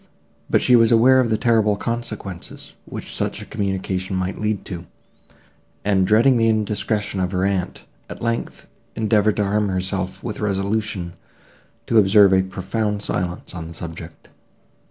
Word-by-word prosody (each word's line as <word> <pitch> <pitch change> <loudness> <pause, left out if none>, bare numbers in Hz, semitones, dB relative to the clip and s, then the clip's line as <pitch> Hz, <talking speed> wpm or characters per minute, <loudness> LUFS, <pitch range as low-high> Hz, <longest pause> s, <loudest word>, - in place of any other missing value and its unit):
But - - +2
she 125 - +5
was 115 -1 +5
aware 125 +3 +6
of 125 -3 +2
the 110 - +2
terrible 110 -3 +2
consequences, 110 -6 -5
which - - -7
such - - -1
a - - -7
communication 95 -2 -2
might 95 0 -2
lead 105 -1 -1
to; 85 -3 -7 1.0
and, 95 -2 +2
dreading 115 +5 +5
the 115 -1 +3
indiscretion 105 -2 -1
of 90 -1 -1
her 90 +1 +1
aunt, 95 -3 -2 0.2
at - - -8
length, 115 0 -3 0.3
endeavoured 110 -1 +2
to 105 - +1
arm 105 +1 +1
herself 95 0 -3
with 110 - -5
resolution 100 -2 -2 0.7
to 115 - +4
observe 100 -1 +6
a 95 - +5
profound 100 +3 -3
silence 90 0 -3
on 80 -3 -6
the 85 - -10
subject. 85 0 -9
100 Hz, 155 wpm, -21 LUFS, 95-110 Hz, 1.0 s, aware